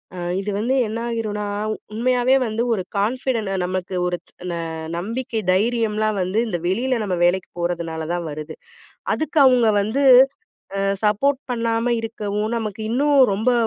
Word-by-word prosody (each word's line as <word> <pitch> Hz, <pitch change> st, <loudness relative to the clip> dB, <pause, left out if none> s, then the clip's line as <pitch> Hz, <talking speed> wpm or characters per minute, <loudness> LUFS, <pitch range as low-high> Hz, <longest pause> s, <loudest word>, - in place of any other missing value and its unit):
அ -, -, -8 dB, 0.2 s
இது 200 Hz, +1 st, -3 dB
வந்து 235 Hz, +5 st, 0 dB
என்னாயிருன்னா, 225 Hz, -2 st, -3 dB, 0.5 s
உண்மையாவே 250 Hz, +3 st, +2 dB
வந்து 225 Hz, 0 st, -2 dB
ஒரு 195 Hz, -4 st, -1 dB
கான்ஃபிடன்ட்ட 225 Hz, -1 st, 0 dB
நமக்கு 185 Hz, 0 st, -3 dB
ஒரு 180 Hz, 0 st, -1 dB, 0.3 s
ந -, -, -3 dB, 0.4 s
நம்பிக்கை, 230 Hz, +5 st, -3 dB
தைரியம்லாம் 215 Hz, +1 st, +1 dB
வந்து 185 Hz, +4 st, 0 dB
இந்த 175 Hz, -5 st, -2 dB
வெளில 240 Hz, +6 st, 0 dB
நம்ம 185 Hz, -3 st, -1 dB
வேலைக்கிப் 175 Hz, 0 st, 0 dB
போறதுனாலதான் 170 Hz, 0 st, -2 dB
வருது. 150 Hz, +1 st, -7 dB, 0.6 s
அதுக்கு 315 Hz, 0 st, 0 dB
அவுங்க 245 Hz, -4 st, +5 dB
வந்து 235 Hz, +8 st, 0 dB, 0.7 s
அ -, -, 0 dB, 0.2 s
சப்போர்ட் 255 Hz, +7 st, +2 dB
பண்ணாம 230 Hz, 0 st, 0 dB
இருக்கவும், 215 Hz, -1 st, -3 dB
நமக்கு 220 Hz, -2 st, -4 dB
இன்னும் 285 Hz, +5 st, +2 dB, 0.2 s
ரொம்ப 220 Hz, +6 st, +1 dB
215 Hz, 130 wpm, -21 LUFS, 190-240 Hz, 0.7 s, அவுங்க